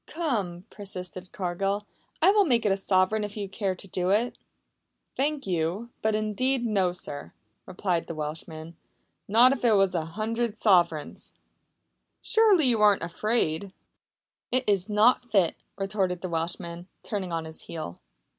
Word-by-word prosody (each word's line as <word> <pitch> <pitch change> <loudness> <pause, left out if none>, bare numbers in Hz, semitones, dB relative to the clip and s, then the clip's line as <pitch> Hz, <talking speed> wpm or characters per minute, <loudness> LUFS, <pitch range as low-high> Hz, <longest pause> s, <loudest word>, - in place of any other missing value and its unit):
"Come," 205 - -2
persisted 185 -2 -5
Cargill, 195 +2 -2 0.4
"I 375 - +7
will 415 0 +5
make 240 -7 +2
it 205 - +3
a - - +3
sovereign 195 +2 +2
if 205 +1 -6
you 200 -1 -3
care 195 -1 -2
to 195 - -10
do 180 0 -1
it." 220 +5 +2 0.8
"Thank 290 +1 -1
you, 185 +6 -2
but 220 0 +1
indeed, 240 +4 0
no, 195 -5 +2
sir," 145 - -6 0.3
replied 180 -2 -1
the 165 - -5
Welshman. 155 +2 -6 0.5
"Not 235 +5 +6
if 275 - -2
it 230 -3 +5
wass 195 -2 +3
a 165 -3 -1
hundred 220 +5 -2
sofereigns!" 175 -8 +1 0.8
"Surely 425 -8 +4
you 235 -4 +3
are 205 -1 +7
not 165 +1 -6
afraid?" 200 -3 0 0.8
"It 255 +1 +2
iss 200 -1 +2
not 235 +3 +3
fit," 190 -6 +3 0.2
retorted 195 -3 -1
the 185 - -4
Welshman, 170 +1 -3 0.2
turning 195 -4 -3
on 165 -1 -2
his 160 0 -7
heel. 155 - -6
195 Hz, 155 wpm, -27 LUFS, 175-225 Hz, 0.8 s, I